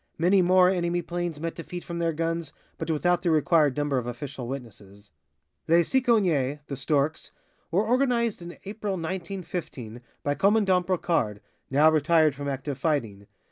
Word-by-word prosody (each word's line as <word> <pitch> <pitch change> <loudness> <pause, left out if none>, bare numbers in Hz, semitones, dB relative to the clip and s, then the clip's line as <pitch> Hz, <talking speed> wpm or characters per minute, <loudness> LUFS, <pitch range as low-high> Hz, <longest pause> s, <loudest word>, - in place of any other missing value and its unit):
Many 185 +4 +4
more 180 +1 +5
enemy 175 -1 0
planes 175 -3 -4
met 165 +1 -3
defeat 175 +1 -7
from 170 0 -5
their 165 -1 +1
guns, 165 0 -3 0.3
but - - -4
without 175 +3 +1
the 175 - 0
required 155 -3 +3
number 145 -3 +1
of 120 - -6
official 125 0 -6
witnesses. 105 -6 -9 0.6
"Les 170 +1 +5
Cicognes" 185 - +2
(The 140 - -5
Storks) 150 +2 0 0.4
were 190 +6 +1
organized 235 -3 +1
in 175 0 -9
April, 205 0 -4
1915, 170 - -5 0.2
by 145 - +1
Commandant 195 0 +2
Brocard, 165 - 0 0.3
now 150 +4 +5
retired 155 0 +3
from 140 +1 -6
active 140 0 -4
fighting. 115 -11 -1
165 Hz, 150 wpm, -26 LUFS, 140-180 Hz, 0.6 s, more